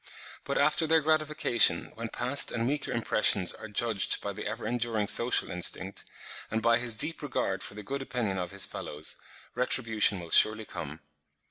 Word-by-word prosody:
But - - -2
after 160 - +2
their 160 0 +3
gratification 155 -5 +3
when 115 0 -6
past 130 +5 +1
and 115 0 -2
weaker 145 +2 -3
impressions 110 -5 +2
are - - -10
judged 105 -1 0
by 100 - -5
the 105 +1 -6
ever 110 +3 -6
enduring 115 -3 -1
social 120 +4 +3
instinct, 95 +2 -1 0.4
and 110 - -1
by 115 +1 +2
his 120 -2 -2
deep 165 +10 +1
regard 120 -9 -2
for - - -7
the 105 - -8
good 140 +7 -5
opinion 120 -8 -3
of 90 -1 -4
his 100 +1 -1
fellows, 75 +1 -6 0.4
retribution 115 -5 +1
will 85 -1 -10
surely 110 0 +4
come. 75 -3 -8
115 Hz, 170 wpm, -28 LUFS, 100-125 Hz, 0.4 s, surely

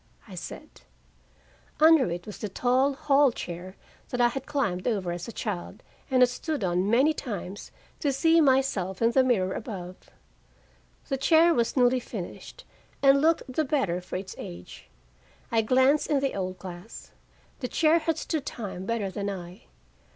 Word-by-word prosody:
I - - -12
said. - - -9 1.0
Under 315 - +6
it 175 +1 -5
was 210 -4 -9
the 210 - -4
tall 255 +6 +2
hall 285 -2 +4
chair 180 -2 -7 0.3
that 245 - -3
I 240 0 +5
had 270 +2 -6
climbed 245 -12 -1
over 195 -7 -1
as 175 0 -5
a - - -6
child, 205 -6 -5 0.3
and 255 -1 +5
had 250 - +5
stood 290 +1 -3
on 180 +2 +1
many 265 +7 +4
times, 205 - -6 0.3
to 285 - +1
see 325 +5 +4
myself 260 - +1
in 230 0 +3
the 260 +2 +4
mirror 190 -7 +1
above. 185 -5 -7 1.0
The 270 - -1
chair 325 +5 +5
was 235 0 0
newly 250 0 +4
finished 230 - -8 0.4
and 275 0 +6
looked 325 +2 +3
the 265 +5 -1
better 260 - 0
for 180 - -8
its 190 +1 -5
age. 85 0 -10 0.6
I 225 -1 +3
glanced 260 +6 +3
in 290 -2 +2
the 275 0 -1
old 185 -1 -3
glass. 180 +3 -10 0.5
The 250 - -3
chair 320 +5 +3
had 325 0 -1
stood 315 -3 -3
time 195 -7 -6
better 220 -4 -1
than 200 +1 -3
I. 180 +1 -8
240 Hz, 165 wpm, -27 LUFS, 190-275 Hz, 1.0 s, Under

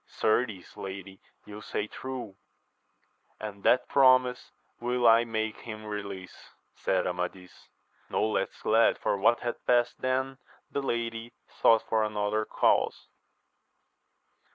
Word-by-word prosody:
Certes, 110 -4 -1
lady, 95 0 -7 0.3
you 105 0 -9
say 105 - -3
true, 125 -3 -7 1.0
and 105 -2 -7
that 125 +4 +3
promise 130 -2 +4 0.3
will 120 0 +1
I 115 +1 +6
make 110 -1 -2
him 110 -2 -8
release, 100 -3 -7 0.3
said - - 0
Amadis; 90 +1 -5 0.4
no - - +1
less 110 - 0
glad 115 +1 +4
for - - 0
what 115 +4 +3
had 120 -1 -4
past 120 -1 +2
than 130 +1 -1 0.3
the 140 - -1
lady, 115 -2 -3 0.3
though 115 - +7
for 110 0 0
another 105 0 -1
cause. - - +1
110 Hz, 120 wpm, -28 LUFS, 105-120 Hz, 1.0 s, though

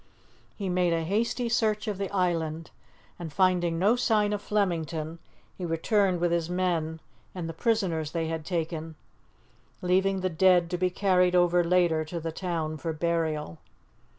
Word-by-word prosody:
He 200 -3 -3
made 180 -1 +1
a 165 -1 0
hasty 230 +7 0
search 220 -2 +1
of 205 -2 -3
the 195 - -2
island, 165 -4 -1 0.5
and, 165 -3 -6
finding 175 -1 +2
no 200 +7 +3
sign 215 -4 +2
of 205 - -2
Flemington, 165 -6 -2 0.4
he 185 - -8
returned 180 +3 +1
with 175 0 +1
his 170 -1 0
men 170 -3 -1 0.4
and 175 -3 -4
the 165 - -5
prisoners 175 -6 0
they 165 0 -2
had 160 0 -3
taken, 160 -2 -3 0.9
leaving 190 +1 +2
the 185 - +1
dead 175 +1 +4
to 180 - 0
be 185 0 +2
carried 180 -1 +2
over 175 0 +4
later 170 -2 +2
to 170 +2 -5
the 165 0 -4
town 160 -3 -3
for 165 +1 -3
burial. 155 - -2
175 Hz, 160 wpm, -27 LUFS, 165-190 Hz, 0.9 s, dead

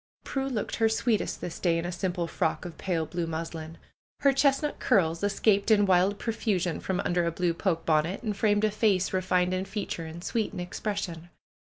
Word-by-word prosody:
Prue 270 -1 -2
looked 225 -6 -3
her 225 -1 +3
sweetest 220 0 0
this 170 - -5
day, 170 -2 +2
in 165 - -2
a 175 - -2
simple 175 -1 -2
frock 160 +1 -1
of 175 - -8
pale 170 -4 -1
blue 170 +1 -3
muslin. 165 0 -5 0.4
Her 275 -1 +5
chestnut 275 +2 +2
curls 170 -9 +2
escaped 205 0 +2
in 205 -2 +5
wild 190 +2 +3
profusion 200 -7 -1
from 190 -1 -1
under 175 0 +1
a 170 - 0
blue 175 0 0
poke 165 -2 -1
bonnet, 160 +4 +1
and 210 -2 -2
framed 205 0 +2
a 215 - +1
face 200 -4 +1
refined 185 -1 +1
in 185 +1 -1
feature 195 -5 -4
and 165 +2 -8
sweet 220 +1 -1
in - - -5
expres 200 +3 -3
sion. 170 -2 -6
185 Hz, 200 wpm, -28 LUFS, 170-210 Hz, 0.4 s, Her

